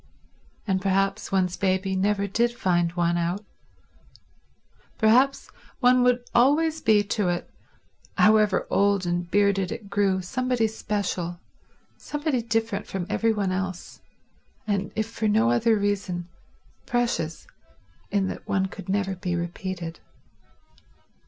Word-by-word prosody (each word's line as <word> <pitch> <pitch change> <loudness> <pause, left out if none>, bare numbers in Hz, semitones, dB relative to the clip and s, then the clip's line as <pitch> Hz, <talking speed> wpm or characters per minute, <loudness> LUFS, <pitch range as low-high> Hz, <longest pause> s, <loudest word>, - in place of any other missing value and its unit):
And 190 -2 0
perhaps 195 +2 0
one's 185 -2 +1
baby 190 0 0
never 200 +1 +1
did 235 +5 +1
find 175 -2 +1
one 175 -1 +1
out; 175 +5 -2 1.5
perhaps 250 +5 +3 0.3
one 250 -1 +5
would 245 0 +2
always 305 +6 +3
be 210 -1 +4
to 205 -2 -1
it, 175 0 -3 0.7
however 215 -2 +4
old 200 -2 +2
and 175 0 -2
bearded 200 -1 +2
it 200 -3 -7
grew, 200 -2 +2
somebody 250 +2 0
special, 195 -5 -3 0.6
somebody 295 -4 -2
different 225 -2 -2
from 190 -2 -4
every 225 +1 +2
one 200 -3 -1
else, 185 -1 -4 0.6
and 200 -2 -1
if 220 - 0
for 225 -1 -2
no 115 - +3
other 220 - +3
reason, 200 -4 -2 0.6
precious 240 -11 -1 0.6
in 195 -2 +1
that - - -7
one 190 -1 +1
could 190 +1 -9
never 195 0 0
be 180 -1 -3
repeated. 175 0 -5
200 Hz, 125 wpm, -25 LUFS, 185-220 Hz, 1.5 s, one